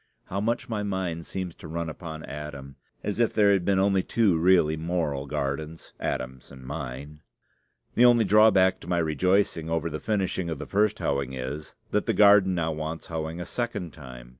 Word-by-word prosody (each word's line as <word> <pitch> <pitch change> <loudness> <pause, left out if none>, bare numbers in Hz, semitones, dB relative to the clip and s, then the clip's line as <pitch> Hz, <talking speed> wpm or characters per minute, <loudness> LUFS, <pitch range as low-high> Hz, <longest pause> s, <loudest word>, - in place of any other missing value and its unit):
(How 100 +2 -3
much 115 +3 -1
my 110 -3 -2
mind 95 -5 -3
seems 90 -3 -4
to - - -10
run 85 +1 -3
upon 80 0 -7
Adam, 70 -2 -8 0.3
as 105 +2 -3
if 115 - +2
there 105 -2 +5
had 95 -3 +1
been 95 +1 +2
only 95 0 +3
two 105 -3 +2
really 85 -3 +4
moral 80 -4 -2
gardens 75 +4 -4
Adam's 65 0 -4
and 65 -2 -12
mine!) 70 +1 -7 0.7
The 120 - +5
only 120 -2 +6
drawback 100 -3 +5
to - - -13
my 90 -1 0
rejoicing 85 +1 +1
over 80 0 -1
the 75 - -4
finishing 95 -4 -1
of 80 - -3
the - - -6
first 105 +1 +1
hoeing 70 -2 -1
is, 65 +4 -6 0.2
that 105 - 0
the - - +2
garden 100 -3 +6
now 80 -2 0
wants 80 +1 -5
hoeing 80 0 -4
a 90 - -4
second 120 -9 -4
time. 60 -5 -11
85 Hz, 190 wpm, -26 LUFS, 75-100 Hz, 0.7 s, only